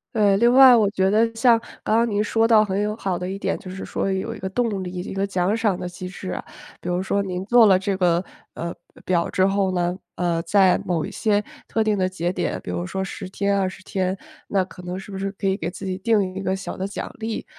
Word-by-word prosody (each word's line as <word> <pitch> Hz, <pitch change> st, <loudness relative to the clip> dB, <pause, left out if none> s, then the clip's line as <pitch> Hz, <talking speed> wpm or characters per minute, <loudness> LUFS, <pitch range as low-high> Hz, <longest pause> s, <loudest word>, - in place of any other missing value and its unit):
呃， 205 Hz, -3 st, +4 dB
另 235 Hz, +2 st, +4 dB
外 260 Hz, -1 st, +9 dB
我 215 Hz, -4 st, +3 dB
觉 190 Hz, -2 st, +1 dB
得 225 Hz, +2 st, +3 dB
像 230 Hz, 0 st, +5 dB, 0.2 s
刚 220 Hz, -, +2 dB
刚 235 Hz, 0 st, +2 dB
您 205 Hz, 0 st, +1 dB
说 225 Hz, +1 st, +2 dB
到 215 Hz, -2 st, +5 dB
很 195 Hz, 0 st, -1 dB
有 210 Hz, +1 st, -1 dB
好 190 Hz, -4 st, -2 dB
的 180 Hz, -, -4 dB
一 195 Hz, -, -4 dB
点， -, -, -1 dB
就 185 Hz, -, -10 dB
是 190 Hz, +1 st, -6 dB
说 195 Hz, -, -2 dB
有 205 Hz, +4 st, -2 dB
一 -, -, -10 dB
个 190 Hz, -, -4 dB
动 210 Hz, -3 st, -1 dB
力， 180 Hz, -, -5 dB
一 180 Hz, 0 st, -5 dB
个 195 Hz, +1 st, -1 dB
奖 190 Hz, +2 st, 0 dB
赏 210 Hz, -5 st, 0 dB
的 180 Hz, -, -4 dB
机 180 Hz, +1 st, -7 dB
制 185 Hz, 0 st, -7 dB
啊。 -, -, -4 dB, 0.4 s
比 180 Hz, -, -5 dB
如 180 Hz, +1 st, 0 dB
说 200 Hz, +1 st, 0 dB
您 185 Hz, -1 st, -4 dB
做 235 Hz, 0 st, +6 dB
了 190 Hz, -, +6 dB
这 195 Hz, +1 st, -1 dB
个， 175 Hz, -1 st, +2 dB, 0.3 s
呃， 170 Hz, 0 st, -4 dB, 0.3 s
表 175 Hz, -2 st, +1 dB
之 190 Hz, -1 st, +2 dB
后 195 Hz, -1 st, +1 dB
呢， 175 Hz, 0 st, 0 dB, 0.2 s
呃， 170 Hz, -2 st, 0 dB
在 190 Hz, +2 st, +4 dB
某 170 Hz, -3 st, -1 dB
一 -, -, -7 dB
些 210 Hz, -2 st, +1 dB, 0.2 s
特 220 Hz, -, 0 dB
定 215 Hz, -1 st, +1 dB
的 185 Hz, -1 st, +1 dB
节 175 Hz, -1 st, -2 dB
点， 175 Hz, -4 st, -2 dB
比 90 Hz, -, -5 dB
如 90 Hz, 0 st, -3 dB
说 190 Hz, -, -3 dB
10 190 Hz, -1 st, -6 dB
天 200 Hz, +1 st, 0 dB
20 185 Hz, 0 st, -3 dB
天， 190 Hz, 0 st, -2 dB, 0.3 s
那 195 Hz, -2 st, +1 dB
可 180 Hz, -, -12 dB
能 180 Hz, +1 st, -5 dB
是 200 Hz, -, -10 dB
不 190 Hz, -, -5 dB
是 195 Hz, 0 st, -2 dB
可 195 Hz, -, -7 dB
以 190 Hz, 0 st, +2 dB
给 170 Hz, -2 st, -3 dB
自 190 Hz, +2 st, -8 dB
己 185 Hz, -1 st, -2 dB
定 200 Hz, -3 st, +1 dB
一 195 Hz, -, -4 dB
个 190 Hz, 0 st, 0 dB
小 190 Hz, -, -6 dB
的 190 Hz, +1 st, -3 dB
奖 200 Hz, -, -5 dB
励， 225 Hz, 0 st, -4 dB
190 Hz, 275 characters per minute, -23 LUFS, 185-210 Hz, 0.4 s, 外